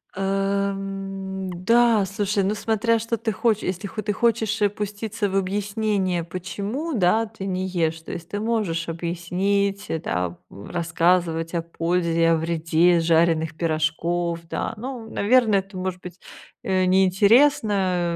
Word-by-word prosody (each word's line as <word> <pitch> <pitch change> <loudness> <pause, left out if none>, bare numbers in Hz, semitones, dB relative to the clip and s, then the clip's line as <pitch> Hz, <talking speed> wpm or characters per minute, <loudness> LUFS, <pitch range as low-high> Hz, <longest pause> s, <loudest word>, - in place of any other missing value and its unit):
Эм, 195 -1 -2
да, 230 0 +4
слушай. 200 +1 -1
Ну, 200 +3 +1
смотря 225 +2 +1
что 230 +1 -2
ты 225 0 -2
хочешь. 220 0 +1
Если 185 +2 -3
хо 215 +2 -5
ты 210 0 -1
хочешь 220 0 +1 0.2
пуститься 210 +1 -3
в 195 - 0
объяснение, 200 -2 -1
почему, 200 - -4
да, 220 +1 +3
ты 215 -3 -8
не 185 -1 -2
ешь, 165 -3 -1
то - - -9
есть 170 -1 -7
ты 205 - -3
можешь 205 -8 -1
объяснить, 185 +4 -1
э, 160 - -1
да, 90 - -2
м, 100 - -11
рассказывать 170 -1 +1
о 170 - 0
пользе, 165 0 +1
о 165 - +5
вреде 165 +1 +2
жареных 165 -1 +2
пирожков, 165 +1 -1
да. - - -3
Ну, 235 0 -7
наверно, 225 0 +3
это, 195 0 -2
может 185 0 -4
быть, 180 0 -10 0.4
э, 185 -1 +1
неинтересно, 190 -2 +3
190 Hz, 140 wpm, -23 LUFS, 170-210 Hz, 0.4 s, о